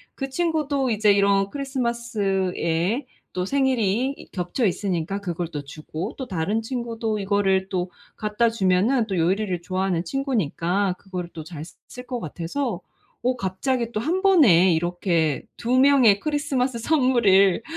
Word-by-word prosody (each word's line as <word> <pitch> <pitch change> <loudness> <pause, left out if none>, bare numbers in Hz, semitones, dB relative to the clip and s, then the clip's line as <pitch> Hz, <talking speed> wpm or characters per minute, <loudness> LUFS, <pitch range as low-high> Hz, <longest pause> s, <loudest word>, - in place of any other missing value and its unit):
그 270 -1 -4
친구도 295 -4 0
이제 210 -1 +3
이런 200 0 +3
크리스마스에 235 - -1 0.3
또 180 0 -2
생일이 255 -1 +1
이 - - -13
겹쳐 180 +7 -2
있으니까 190 0 -2
그걸 175 -3 -3
또 150 -3 -6
주고 155 - -6
또 260 - -5
다른 190 +4 -1
친구도 225 -2 -3
이거를 195 -1 +1
또 180 -1 -2 0.3
갖다주면은 215 +1 +1
또 190 -3 -2
요리를 180 +1 0
좋아하는 185 -2 -1
친구니까 200 - -1
그거를 180 -3 -6
또 160 - -7
잘 155 -1 -8
쓰 - - -15
쓸 250 0 -10
것 250 -1 -4
같아서 175 - -4 0.4
어 250 +1 +1
갑자기 235 +4 -2
또 215 - -2
1 340 +10 -1
번에 225 - +6
이렇게 170 -3 0
2 250 +2 +1
명의 260 -7 +5
크리스마스 275 -4 -1
선물을 230 - +3
205 Hz, 295 characters per minute, -23 LUFS, 180-255 Hz, 0.4 s, 번에